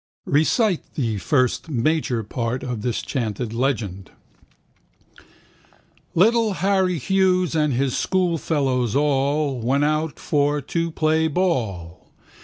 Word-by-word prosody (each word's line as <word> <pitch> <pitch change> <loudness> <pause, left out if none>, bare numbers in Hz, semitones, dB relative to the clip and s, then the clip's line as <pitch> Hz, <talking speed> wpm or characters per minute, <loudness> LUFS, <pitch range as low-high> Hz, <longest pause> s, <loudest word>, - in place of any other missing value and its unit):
Recite 175 - +1
the 115 -7 -1
first 130 - 0
(major) 130 -3 0
part 115 +3 -3
of 125 -4 -4
this 120 +1 -2
chanted 115 -2 -3
legend. 110 -8 -2 2.1
Little 220 +3 +3
Harry 190 -2 +1
Hughes 185 +3 +1
and 150 -2 +1
his 130 +1 0
schoolfellows 145 - 0
all 140 -1 +1
Went 135 +5 +1
out 155 0 0
for 145 0 0
to 165 +4 -2
play 160 0 +1
ball. 110 - -2
145 Hz, 105 wpm, -22 LUFS, 120-165 Hz, 2.1 s, Little